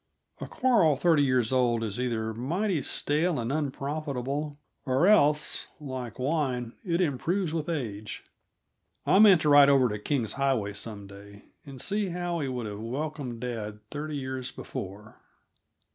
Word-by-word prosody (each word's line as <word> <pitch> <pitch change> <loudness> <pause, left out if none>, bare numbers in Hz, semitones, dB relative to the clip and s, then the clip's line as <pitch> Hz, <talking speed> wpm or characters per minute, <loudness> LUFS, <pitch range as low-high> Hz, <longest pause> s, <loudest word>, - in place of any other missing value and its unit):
A - - -5
quarrel 220 - +3
thirty 160 +1 +3
years 130 -4 +2
old 120 -3 +2
is 110 +1 -3
either 115 -3 -1
mighty 165 - -1
stale 150 +2 0
and 115 +2 -2
unprofitable, 145 0 -3 0.3
or 135 +4 +2
else, 150 -7 +3
like 130 -5 -6
wine, 130 -4 -1
it 170 -2 0
improves 170 +3 0
with 160 -1 -2
age. 110 -10 -4 0.8
I 190 - +5
meant 200 -6 +8
to 150 - +2
ride 145 -1 +8
over 135 -3 +5
to 105 0 -4
King's 120 -1 -1
Highway 130 -7 0
some 105 0 -6
day, 100 +1 -13 0.2
and 135 -2 -9
see 205 +5 -1
how 175 -1 -2
he 140 - -2
would 125 -3 -3
have 105 -1 -6
welcomed 130 0 -4
dad 110 -4 -4
thirty 150 0 -4
years 130 -1 -4
before. 100 +3 -8
135 Hz, 150 wpm, -28 LUFS, 115-155 Hz, 0.8 s, meant